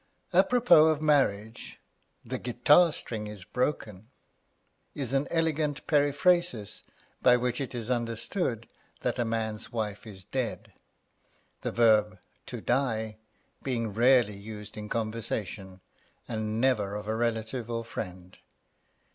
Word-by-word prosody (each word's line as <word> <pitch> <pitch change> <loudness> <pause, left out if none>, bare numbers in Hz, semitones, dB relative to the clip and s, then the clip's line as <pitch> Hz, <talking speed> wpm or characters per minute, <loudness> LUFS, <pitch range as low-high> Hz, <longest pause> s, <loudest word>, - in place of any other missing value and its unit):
Apropos 240 -11 +6
of 155 -2 +2
marriage, 115 -8 0 0.5
the 130 +2 -4
guitar 145 +8 +4
string 110 -7 -4
is 105 -3 -8
broken, 110 -5 -2 0.9
is 135 -3 -3
an 135 +1 +1
elegant 155 -3 0
periphrasis 145 - +2 0.4
by 125 -1 +6
which 125 +2 -1
it 130 -2 -5
is 120 0 -3
understood 115 - -2 0.4
that - - -1
a 120 - +1
man's 110 -1 -3
wife 110 -2 -4
is 95 -3 -10
dead, 125 +5 -4 0.9
the - - -2
verb 110 -4 +4 0.3
"to - - -6
die" 110 -4 0 0.4
being 115 -5 -2
rarely 120 -2 +4
used 105 +1 -9
in 105 0 -7
conversation, 110 -4 -4 0.5
and 110 -1 -2
never 110 -6 +1
of 105 0 -6
a 110 - -1
relative 115 +1 -2
or 115 0 -2
friend. 90 -5 -7
115 Hz, 120 wpm, -28 LUFS, 105-135 Hz, 0.9 s, Apropos